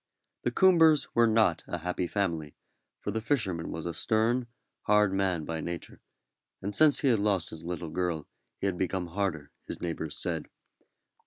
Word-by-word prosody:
The -, -, 0 dB
Coombers 165 Hz, -5 st, +5 dB
were 120 Hz, 0 st, +5 dB
not 110 Hz, -7 st, +3 dB
a 85 Hz, -, -3 dB
happy 90 Hz, +1 st, -2 dB
family, 85 Hz, -7 st, -2 dB, 0.4 s
for -, -, -3 dB
the 110 Hz, -, -2 dB
fisherman 105 Hz, -, -1 dB
was 80 Hz, -, -5 dB
a 85 Hz, -, -2 dB
stern, 115 Hz, +5 st, +1 dB, 0.4 s
hard 105 Hz, -2 st, +4 dB
man 95 Hz, -5 st, 0 dB
by 80 Hz, 0 st, -3 dB
nature, 85 Hz, 0 st, -6 dB, 0.6 s
and 100 Hz, +2 st, -4 dB
since 155 Hz, +2 st, +5 dB
he 140 Hz, -, +3 dB
had 115 Hz, -4 st, +3 dB
lost 100 Hz, -5 st, 0 dB
his 80 Hz, 0 st, -8 dB
little 85 Hz, -1 st, -4 dB
girl 85 Hz, -3 st, -2 dB, 0.3 s
he -, -, -4 dB
had 95 Hz, -3 st, -1 dB
become 95 Hz, -1 st, -1 dB
harder, 85 Hz, -5 st, -2 dB, 0.2 s
his -, -, -5 dB
neighbours 80 Hz, -3 st, -4 dB
said. -, -, -3 dB
95 Hz, 170 wpm, -29 LUFS, 85-110 Hz, 0.6 s, Coombers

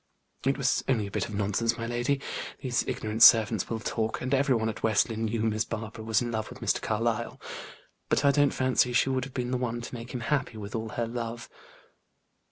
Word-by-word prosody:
"It 135 Hz, -1 st, +2 dB
was 135 Hz, -3 st, +1 dB
only 115 Hz, -6 st, +1 dB
a 100 Hz, -, -7 dB
bit -, -, -2 dB
of 105 Hz, -, -6 dB
nonsense, 105 Hz, +3 st, 0 dB
my 115 Hz, -, -3 dB
lady. 120 Hz, +4 st, 0 dB, 0.4 s
These 125 Hz, -3 st, -1 dB
ignorant 110 Hz, +1 st, -3 dB
servants 110 Hz, -3 st, +7 dB
will 115 Hz, -, -2 dB
talk; 110 Hz, 0 st, -2 dB
and 130 Hz, +2 st, -2 dB
every 135 Hz, -1 st, +3 dB
one 110 Hz, -1 st, 0 dB
at 110 Hz, -, -4 dB
West 110 Hz, +1 st, +3 dB
Lynne 115 Hz, 0 st, -2 dB
knew 110 Hz, 0 st, -1 dB
Miss 110 Hz, -1 st, +1 dB
Barbara 110 Hz, -1 st, -6 dB
was 110 Hz, +1 st, +1 dB
in 120 Hz, -, -3 dB
love 110 Hz, -1 st, -3 dB
with -, -, -11 dB
Mr. -, -, 0 dB
Carlyle. 115 Hz, +1 st, -1 dB, 0.7 s
But -, -, +2 dB
I 140 Hz, -, +7 dB
don't 145 Hz, 0 st, +4 dB
fancy 130 Hz, -1 st, +1 dB
she 130 Hz, -, +3 dB
would 130 Hz, -1 st, 0 dB
have 135 Hz, -, -11 dB
been 125 Hz, -1 st, -2 dB
the 130 Hz, -, +1 dB
one 120 Hz, -1 st, -2 dB
to 120 Hz, -, -8 dB
make 120 Hz, 0 st, -7 dB
him 125 Hz, -, -4 dB
happy 120 Hz, -2 st, -1 dB
with 105 Hz, 0 st, -7 dB
all 110 Hz, -1 st, -3 dB
her 115 Hz, +2 st, -2 dB
love." 115 Hz, 0 st, -5 dB
115 Hz, 225 wpm, -28 LUFS, 110-125 Hz, 0.7 s, servants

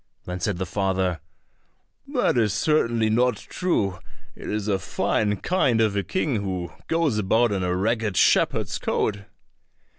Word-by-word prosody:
Then 90 Hz, 0 st, -5 dB
said 90 Hz, +1 st, -1 dB
the 95 Hz, -, -2 dB
father, 95 Hz, -2 st, -1 dB, 0.9 s
"That -, -, +1 dB
is 110 Hz, -5 st, +2 dB
certainly 115 Hz, -4 st, +2 dB
not 120 Hz, 0 st, +2 dB
true; 100 Hz, -, -1 dB, 0.4 s
it -, -, -8 dB
is 105 Hz, 0 st, -2 dB
a 100 Hz, -2 st, +1 dB
fine 105 Hz, +2 st, 0 dB
kind 130 Hz, -, +1 dB
of 110 Hz, -2 st, +2 dB
a 100 Hz, -, +1 dB
king 145 Hz, -, -1 dB
who 95 Hz, -4 st, -3 dB, 0.2 s
goes 165 Hz, -9 st, +1 dB
about 110 Hz, +3 st, +2 dB
in 100 Hz, -2 st, -1 dB
a 90 Hz, 0 st, 0 dB
ragged 110 Hz, 0 st, 0 dB
shepherd's -, -, +2 dB
coat." 105 Hz, -1 st, -1 dB
105 Hz, 150 wpm, -24 LUFS, 95-115 Hz, 0.9 s, is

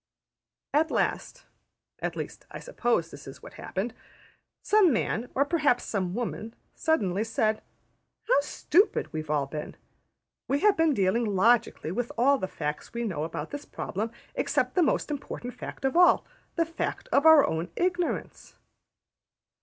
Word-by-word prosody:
At 315 Hz, +2 st, +3 dB
last -, -, -2 dB, 0.5 s
(at -, -, -3 dB
least -, -, -7 dB
I -, -, -8 dB
should -, -, -11 dB
suppose 240 Hz, -, 0 dB
this 145 Hz, +1 st, -11 dB
is 135 Hz, -, -11 dB
what -, -, -11 dB
happened) 215 Hz, +5 st, -4 dB, 0.7 s
some 415 Hz, -5 st, +5 dB
man, 235 Hz, 0 st, -1 dB
or 280 Hz, -, +3 dB
perhaps 290 Hz, -6 st, +2 dB
some 185 Hz, -3 st, -2 dB
woman, 230 Hz, -1 st, -4 dB, 0.2 s
suddenly 210 Hz, -, 0 dB
said: 220 Hz, -1 st, 0 dB, 0.7 s
``How 440 Hz, -, +4 dB
stupid 385 Hz, +7 st, +1 dB
we've 155 Hz, -1 st, -4 dB
all 150 Hz, -2 st, +1 dB
been! 150 Hz, +2 st, -6 dB, 0.7 s
We 280 Hz, +2 st, 0 dB
have 420 Hz, -1 st, +5 dB
been 325 Hz, -3 st, +3 dB
dealing 200 Hz, +4 st, +2 dB
logically 220 Hz, -4 st, +2 dB
with 240 Hz, +5 st, -2 dB
all 275 Hz, +3 st, +4 dB
the 190 Hz, -, -2 dB
facts 150 Hz, +4 st, -5 dB
we 235 Hz, -, -1 dB
knew 185 Hz, -10 st, -2 dB
about 160 Hz, -1 st, -4 dB
this 290 Hz, 0 st, -6 dB
problem, 215 Hz, +4 st, -4 dB, 0.2 s
except -, -, 0 dB
the 365 Hz, -, +3 dB
most 300 Hz, -1 st, +1 dB
important 250 Hz, -3 st, -5 dB
fact -, -, -7 dB
of 265 Hz, -, 0 dB
all, 355 Hz, +1 st, +5 dB, 0.3 s
the 335 Hz, -, +2 dB
fact 330 Hz, +1 st, -4 dB
of 285 Hz, -, +4 dB
our 315 Hz, -3 st, +8 dB
own 160 Hz, +2 st, -2 dB
ignorance. 355 Hz, -1 st, -2 dB
240 Hz, 155 wpm, -27 LUFS, -, 0.7 s, our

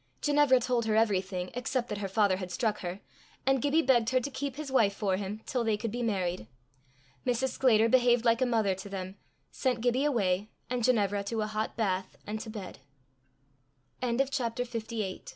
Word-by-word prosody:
Ginevra 290 Hz, -3 st, +4 dB
told 245 Hz, -1 st, 0 dB
her 215 Hz, -1 st, +1 dB
everything 190 Hz, -4 st, +1 dB
except 245 Hz, 0 st, -2 dB
that 210 Hz, -, -3 dB
her 200 Hz, -, -2 dB
father 195 Hz, -1 st, +2 dB
had 185 Hz, -1 st, -5 dB
struck 215 Hz, +3 st, -1 dB
her, 180 Hz, +2 st, -5 dB, 0.4 s
and 270 Hz, -1 st, +3 dB
Gibbie 290 Hz, +3 st, +3 dB
begged 240 Hz, -3 st, +3 dB
her 255 Hz, -, +3 dB
to 280 Hz, +3 st, -5 dB
keep 270 Hz, 0 st, -4 dB
his 295 Hz, -2 st, -6 dB
wife 210 Hz, -6 st, +3 dB
for 195 Hz, -3 st, 0 dB
him 200 Hz, +2 st, -5 dB
till 250 Hz, -2 st, -1 dB
they 220 Hz, -2 st, +1 dB
could 220 Hz, 0 st, -3 dB
be 245 Hz, +2 st, -3 dB
married. 185 Hz, -, -1 dB, 0.8 s
Mrs. 250 Hz, +2 st, +1 dB
Sclater 230 Hz, -5 st, +4 dB
behaved 245 Hz, -1 st, +4 dB
like 230 Hz, +1 st, +3 dB
a 255 Hz, -, +3 dB
mother 220 Hz, -5 st, +2 dB
to 190 Hz, +2 st, -8 dB
them, 190 Hz, 0 st, -6 dB, 0.3 s
sent 255 Hz, -3 st, 0 dB
Gibbie 245 Hz, +4 st, +1 dB
away, 205 Hz, -7 st, +1 dB, 0.2 s
and 250 Hz, -2 st, -1 dB
Ginevra 205 Hz, -5 st, +2 dB
to 220 Hz, +2 st, -2 dB
a -, -, 0 dB
hot 215 Hz, +1 st, -3 dB
bath 190 Hz, -4 st, -1 dB
and 215 Hz, +1 st, -4 dB
to 220 Hz, -, -7 dB
bed. 200 Hz, -9 st, -8 dB, 1.2 s
CHAPTER 250 Hz, +1 st, +2 dB
LIX. 275 Hz, +2 st, -3 dB
CATASTROPHE. 235 Hz, -1 st, -3 dB
Gibbie 230 Hz, -2 st, -2 dB, 0.2 s
went -, -, -12 dB
225 Hz, 200 wpm, -30 LUFS, 200-250 Hz, 1.2 s, Ginevra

